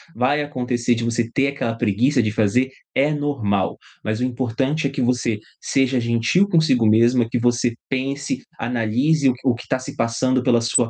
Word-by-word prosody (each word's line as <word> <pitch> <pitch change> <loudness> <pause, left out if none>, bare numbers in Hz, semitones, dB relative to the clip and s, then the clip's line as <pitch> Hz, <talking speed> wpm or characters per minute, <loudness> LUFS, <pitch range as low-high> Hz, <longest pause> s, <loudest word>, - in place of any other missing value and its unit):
vai 135 +5 +1
acontecer 125 -4 -1
de 115 - -3
você 115 0 -1
ter 135 +4 +1
aquela 115 -5 -3
preguiça 120 +4 +2
de 105 - 0
fazer, 110 +5 +1 0.3
é 145 +3 +2
normal. 120 -10 -1 0.3
Mas 110 +1 -2
o - - -1
importante 130 +4 -1
é - - -3
que 135 -1 -2
você 120 -2 0 0.2
seja 135 -1 +1
gentil 115 - +2
consigo 160 - +3
mesma, 115 +2 +3
que 125 - -1
você 120 0 +1
pense, 135 +2 -3 0.2
analise 125 +6 +1
o - - +2
que 125 +2 -7
o 125 - +4
que 120 - -8
está - - -1
se 130 - -8
passando 125 +3 0
pela 120 -2 +3
sua 115 0 +1
125 Hz, 185 wpm, -21 LUFS, 115-135 Hz, 0.3 s, o